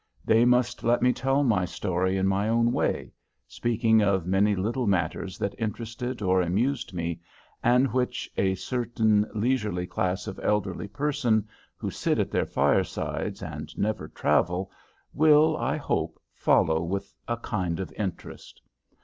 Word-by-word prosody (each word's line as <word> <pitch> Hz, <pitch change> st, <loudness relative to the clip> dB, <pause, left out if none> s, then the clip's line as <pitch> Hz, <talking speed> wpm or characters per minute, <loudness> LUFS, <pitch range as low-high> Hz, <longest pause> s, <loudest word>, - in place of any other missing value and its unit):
They 115 Hz, +2 st, +5 dB
must 125 Hz, 0 st, +2 dB
let 120 Hz, +1 st, +2 dB
me 125 Hz, 0 st, +4 dB
tell 135 Hz, +3 st, +1 dB
my 110 Hz, -8 st, +2 dB
story 95 Hz, +1 st, -1 dB
in 95 Hz, -, +1 dB
my 100 Hz, +2 st, +1 dB
own 115 Hz, +1 st, +3 dB
way, -, -, -1 dB, 0.3 s
speaking 110 Hz, -1 st, +2 dB
of 100 Hz, -4 st, +1 dB
many 100 Hz, +3 st, +2 dB
little 115 Hz, +6 st, -1 dB
matters 90 Hz, 0 st, -1 dB
that 100 Hz, -, -2 dB
interested 115 Hz, +2 st, -4 dB
or 95 Hz, -1 st, +3 dB
amused 115 Hz, +10 st, 0 dB
me, 85 Hz, -2 st, -3 dB, 0.4 s
and 125 Hz, +2 st, +3 dB
which 125 Hz, -1 st, -1 dB
a 95 Hz, -1 st, +1 dB
certain 110 Hz, -2 st, +1 dB
leisurely 105 Hz, -5 st, 0 dB
class 95 Hz, +1 st, -2 dB
of -, -, -6 dB
elderly 100 Hz, -2 st, -1 dB
persons, 120 Hz, -1 st, 0 dB, 0.3 s
who -, -, -4 dB
sit -, -, 0 dB
at -, -, 0 dB
their -, -, 0 dB
firesides -, -, 0 dB
and -, -, -7 dB
never 105 Hz, -7 st, -1 dB
travel, 90 Hz, +7 st, 0 dB, 0.4 s
will, 155 Hz, +1 st, +5 dB
I -, -, -1 dB
hope, -, -, -2 dB
follow 80 Hz, 0 st, +2 dB
with 95 Hz, +4 st, -4 dB
a 120 Hz, -, -1 dB
kind 95 Hz, -8 st, -2 dB
of 95 Hz, -5 st, -4 dB
interest. 100 Hz, -4 st, -6 dB
105 Hz, 150 wpm, -27 LUFS, 95-120 Hz, 0.4 s, They